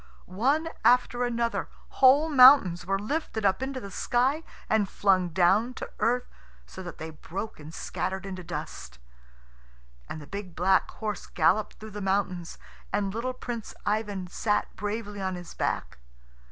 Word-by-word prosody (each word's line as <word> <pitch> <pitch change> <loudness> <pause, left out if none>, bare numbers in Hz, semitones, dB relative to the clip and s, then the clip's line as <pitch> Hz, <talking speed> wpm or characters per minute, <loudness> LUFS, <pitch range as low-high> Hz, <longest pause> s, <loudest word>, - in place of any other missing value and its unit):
One 275 - +1
after 245 0 +4
another 235 -1 -1 0.2
whole 275 +4 +5
mountains 255 - +7
were 195 0 +1
lifted 220 0 -3
up 195 +4 +2
into 265 0 -3
the 200 -5 -9
sky 255 - +1 0.3
and 210 -3 +2
flung 185 -3 +2
down 190 +8 +3
to - - -7
earth, 245 +2 +1 0.4
so 185 - -10
that 175 -4 -8
they 160 0 -6
broke 190 +7 -7
and 150 +1 -10
scattered 190 +3 -4
into 185 -2 -6
dust. 65 - -7 1.1
And 160 - -5
the 145 - -10
big 195 0 -7
black 185 +2 +3
horse 215 -2 -5
galloped 215 -1 +2
through 220 0 -10
the 210 0 -6
mountains, 190 -3 -1 0.3
and 200 -1 0
little 245 +3 -2
Prince 240 -3 -6
Ivan 205 -3 -1
sat 210 +4 -1
bravely 205 0 -4
on 190 -1 -2
his 175 -1 -9
back. - - -2
205 Hz, 155 wpm, -27 LUFS, 185-240 Hz, 1.1 s, mountains